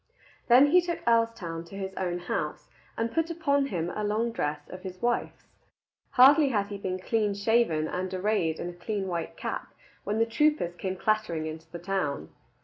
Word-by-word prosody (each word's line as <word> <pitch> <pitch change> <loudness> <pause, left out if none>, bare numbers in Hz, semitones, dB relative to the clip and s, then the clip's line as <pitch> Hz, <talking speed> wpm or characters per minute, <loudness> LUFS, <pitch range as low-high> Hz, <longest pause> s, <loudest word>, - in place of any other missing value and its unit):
Then 265 +4 +7
he 360 +1 +7
took 345 -1 -4
Earlstoun 230 -8 +1
to 195 - -11
his 190 -1 -4
own 180 -2 -2
house, 175 - -4 0.3
and 230 0 -1
put 325 0 +1
upon 285 -4 +1
him 175 -6 -2
a 210 - -3
long 220 +3 0
dress 150 -7 -3
of 185 - -9
his 185 -1 -8
wife's. 240 0 -1 0.7
Hardly 275 +3 +7
had 205 -5 0
he 200 -1 -6
been 185 -1 -2
clean 210 +1 0
shaven 200 -7 +2
and 185 +2 -3
arrayed 185 -4 0
in - - -3
a 175 - -6
clean 195 +2 -3
white 170 -2 -4
cap, - - -5 0.3
when 210 - -1
the 225 - +3
troopers 230 - +1
came 185 +1 -3
clattering 190 -6 0
into 160 +1 -7
the 170 - -5
town. 170 - -2
200 Hz, 185 wpm, -28 LUFS, 175-230 Hz, 0.7 s, Then